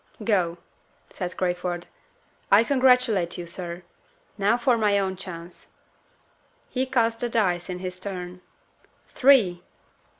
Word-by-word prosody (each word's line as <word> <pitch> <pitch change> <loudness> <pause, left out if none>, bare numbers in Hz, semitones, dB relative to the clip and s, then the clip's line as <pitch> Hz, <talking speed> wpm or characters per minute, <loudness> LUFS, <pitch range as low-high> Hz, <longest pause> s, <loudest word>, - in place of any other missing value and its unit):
"Go," 180 -6 +1 0.5
said 180 -1 -5
Crayford. 180 -1 -2 0.7
"I 205 +3 +7
congratulate 250 -9 +3
you, 175 - -5
sir. 175 0 -6 0.5
Now 205 +3 +2
for 245 0 +2
my 210 -3 +2
own 190 -1 -1
chance." 175 -2 -9 1.0
He 260 0 -1
cast 230 -3 +1
the 240 - -1
dice 185 -6 0
in 180 - -3
his 185 0 -6
turn. 180 -2 -6 0.7
Three! 230 -10 +4
190 Hz, 120 wpm, -25 LUFS, 180-230 Hz, 1.0 s, I